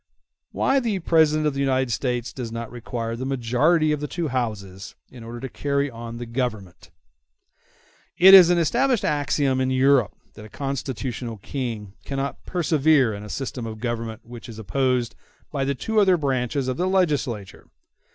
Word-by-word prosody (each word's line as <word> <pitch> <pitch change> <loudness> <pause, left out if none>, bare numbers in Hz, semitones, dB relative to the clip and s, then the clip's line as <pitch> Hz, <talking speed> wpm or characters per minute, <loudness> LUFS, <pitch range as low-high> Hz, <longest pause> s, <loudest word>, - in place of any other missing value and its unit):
Why 275 +1 +2
The 230 -6 -1
President 160 -3 +3
Of 150 - +1
The 135 - -4
United 130 -2 +1
States 125 0 -2
Does 120 -4 -6
Not 115 -1 -6
Require 115 -1 -4
The 120 - -5
Majority 135 +6 +2
Of 150 - 0
The 150 - -4
Two 165 0 -3
Houses 100 -6 -4 0.2
In 125 -2 -11
Order 115 +1 -8
To 135 - -4
Carry 140 +2 -1
On 115 0 -8
The 120 - -6
Government 115 -6 -4 1.3
It 190 +2 +8
is 185 -3 +10
an 175 - +3
established 240 - +1
axiom 140 -2 +1
in 130 - +1
Europe 130 -4 +3 0.2
that 105 - -12
a - - -12
constitutional 125 -3 -4
King 110 -3 -5
cannot 140 0 -4
persevere 155 -7 +2
in 100 - -7
a 105 - -9
system 125 -2 -4
of 110 -1 -6
government 115 -1 -4
which 120 0 -10
is 110 - -9
opposed 125 +3 0 0.4
by 140 -3 -1
the 140 +1 -1
two 220 - 0
other 190 -3 +4
branches 135 -2 -1
of 130 - -2
the 180 +2 0
legislature. 145 - -1
130 Hz, 170 wpm, -23 LUFS, 115-150 Hz, 1.3 s, is